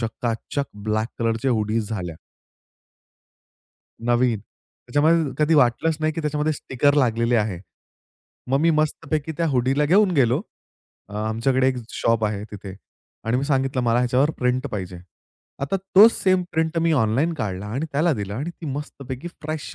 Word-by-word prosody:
चकाचक 115 +4 -3
ब्लॅक 110 +2 -2
कलरच्या 115 +3 0
हुडीज 110 -1 0
झाल्या. 90 -7 -4 1.9
नवीन, 120 -2 +2
त्याच्यामध्ये 145 +7 -1
कधी 155 +1 +3
वाटलंच 145 +3 +3
नाही, 155 0 +1
की 165 - -4
त्याच्यामध्ये 150 0 0
स्टिकर 145 0 +1
लागलेले 120 -3 +2
आहे. 105 -5 -1 0.9
मग 135 - +3
मी 165 +1 +4
मस्तपैकी 155 0 -1
त्या 170 - +1
हुडीला 135 +2 +2
घेऊन 190 +5 +4
गेलो 130 -1 +3 0.7
अ, 105 - -11
आमच्याकडे 115 +5 +1
एक 130 - -1
शॉप 115 -1 +1
आहे 105 -1 -2
तिथे 100 -2 -8 0.5
आणि 115 +2 +1
मी 135 - 0
सांगितलं, 135 -2 0
"मला 120 0 +2
ह्याच्यावर 125 +4 +2
प्रिंट 125 +2 0
पाहिजे." 95 -4 -5 0.6
आता 140 +8 0 0.2
तो 210 +3 +11
सेम 185 -4 +1
प्रिंट 160 +1 0
मी 165 0 +2
ऑनलाईन 125 +10 +1
काढला 100 -6 -4
आणि 130 +10 -3
त्याला 155 +4 +2
दिला 100 -3 -4
आणि 150 +7 -3
ती 170 -1 -10
मस्तपैकी 140 0 -6
फ्रेश 155 0 -5
130 Hz, 150 wpm, -23 LUFS, 115-155 Hz, 1.9 s, तो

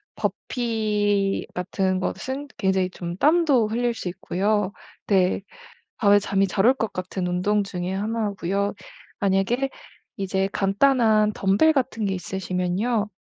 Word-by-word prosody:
버피 210 -4 0
같은 185 +1 -1
것은 265 +9 -4
굉장히 190 -2 +1
좀 175 0 -6
땀도 295 - +4
흘릴 240 +2 0
수 190 - -6
있고요. 200 +3 -1 0.4
네. 190 -1 +2 0.6
밤에 205 -1 +5
잠이 195 -1 +1
잘 195 +2 +1
올 255 - +7
것 225 -5 -3
같은 185 0 -3
운동 195 +4 +1
중에 180 -2 -4
1 215 +1 -1
고요. 200 +3 0 0.5
만약에 200 +7 +1 0.5
이제 195 0 0
간단한 215 +1 +3
덤벨 200 +13 +3
같은 250 -5 -1
게 195 - 0
있으시면요. 190 +4 -1
200 Hz, 235 characters per minute, -24 LUFS, 190-225 Hz, 0.6 s, 올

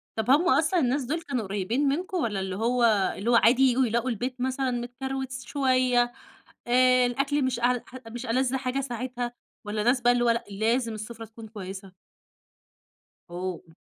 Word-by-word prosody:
طب 220 +2 -2
هم 335 +6 +4
أصلًا 335 +3 +3
الناس 265 0 +1
دول 315 +7 -2
كانوا 260 -7 -3
قريبين 205 +8 -1
منكم 360 +5 -2
والّا 215 - -1
اللي 190 -1 -3
هو 240 +3 +1 0.3
اللي 215 +5 -2
هو 240 - +5
عادي 240 +3 +5
ييجوا 260 0 +4
يلاقوا 235 +3 0
البيت 250 +2 -3
مثلًا 260 0 0
متكروت 260 +2 -4
س 260 0 -6
شوية، 255 -3 +2 0.6
آآ 255 0 +5
الأكل 275 +3 0
مش 250 -2 -1
أعل 245 0 +2
ح 255 - -14
مش 240 +2 -7
ألَذ 255 +2 +1
حاجة 260 +1 -1
ساعتها 245 -1 -4 0.3
والّا 210 0 -2
ناس 245 +1 +3
بقى 240 +1 +5
اللي 240 0 +1
هو 235 - +3
لأ، 230 0 +1
لازم 230 +3 0
السُفرة 225 +1 -7
تكون 220 0 -12
كويسة؟ 195 -2 -8 1.4
أوه! 180 -2 -6
245 Hz, 175 wpm, -26 LUFS, 225-260 Hz, 1.4 s, هو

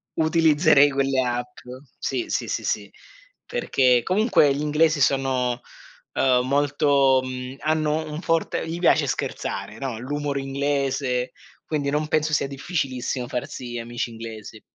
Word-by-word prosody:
utilizzerei 155 -2 +4
quelle 135 -1 +1
app 125 0 -3 0.4
sì, 355 - -2
sì, - - -1
sì, - - -2 0.5
perché 130 - +2
comunque 185 - +3
gli 145 - -3
inglesi 150 0 +2
sono, 130 -3 +1 0.5
ehm, 125 -1 +2
molto, 140 -1 +3
mhmm 130 +1 -6
hanno 155 0 0
un 150 - -5
forte 165 -1 0
gli 165 +1 -4
piace 175 - +4
scherzare 110 - -4
no, 130 -5 -4
l'humor 145 +2 -3
inglese, 135 -2 -1 0.3
quindi 145 -3 -1
non 150 +1 0
penso 155 0 0
sia 145 - +2
difficilissimo 135 -4 -3
farsi 120 0 -5
amici 120 +1 -4
inglesi. 110 -1 -9
140 Hz, 125 wpm, -24 LUFS, 125-150 Hz, 0.5 s, utilizzerei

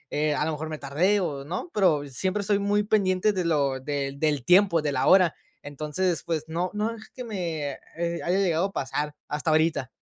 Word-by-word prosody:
Eh, 150 0 +1
a 150 - 0
lo 160 - -1
mejor 155 +1 -4
me 155 - -4
tardé, 160 +9 +1
o,¿no?, 165 - -4
pero 170 -8 +3
siempre 185 +10 -1
estoy 200 0 +1
muy 205 +1 +1
pendiente 205 -1 +2
de 185 -3 -1
lo 140 -5 +1
del 140 0 -3
del 150 -4 +1
tiempo, 180 -3 +5
de 150 - 0
la 130 -2 0
hora, 185 -4 +6 0.3
entonces, 155 +5 -2
pues 160 -3 -2
no, 170 +3 -2
no 210 +2 -1
es 220 - -13
que 255 - -8
me, 170 -10 -3 0.3
eh, 170 0 -2
haya 180 +2 +1
llegado 180 -3 +2
a 195 - -3
pasar 145 +2 -3
hasta 150 +2 -2
ahorita. 155 -4 +2
165 Hz, 205 wpm, -26 LUFS, 150-190 Hz, 0.3 s, hora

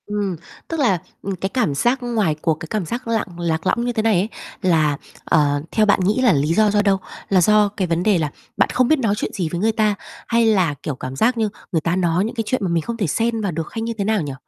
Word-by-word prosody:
Ừm, 205 -3 -2 0.3
tức 325 - -3
là, 235 -10 +3 0.2
ừm, 195 -1 -3
cái 190 +2 -3
cảm 220 - 0
giác 240 - +2
ngoài 215 -10 0
cuộc, 160 - +2
cái 160 - -7
cảm 210 -5 -1
giác 235 +8 -5
lặn 225 -2 0
lạc 165 -2 -1
lõng 235 - +1
như 245 - -1
thế 220 - 0
này 225 -1 +3
ấy 200 +4 -1 0.3
là, 155 -6 +2 0.3
ờ, 145 -2 +2
theo 215 - +3
bạn 205 - +3
nghĩ 205 +7 +1
là 245 -5 +5
lý 150 +2 +1
do 215 +3 +4
do 205 0 +3
đâu? 200 -2 +3 0.3
Là 190 -2 +4
do 210 +3 +4
cái 185 - 0
vấn 170 +1 0
đề 205 -2 +3
là 155 -3 -1 0.3
bạn - - +3
không 255 -1 +3
biết 310 +1 +3
nói 220 -5 +1
chuyện - - -3
gì 175 -5 -2
với 175 - -3
người 220 +2 +3
ta, 215 -2 +1 0.3
hay 235 0 +3
là, 190 -8 +3
kiểu, 150 - -3
cảm 130 +1 -6
giác 235 - +2
như 220 -2 +1 0.2
người 165 -4 +1
ta 165 +2 0
nói 180 +1 +1
những 225 - -5
cái 225 - -1
chuyện 255 - 0
mà 185 - 0
mình 170 -1 +1
không 235 +7 -5
thể 200 -6 0
xen 225 +7 0
vào 200 -3 -1
được 165 -1 -4
hay 225 - -3
như 230 +1 -2
thế 200 - -1
nào 215 -1 +1
nhỉ? 145 -3 -4
200 Hz, 280 wpm, -21 LUFS, 165-225 Hz, 0.3 s, là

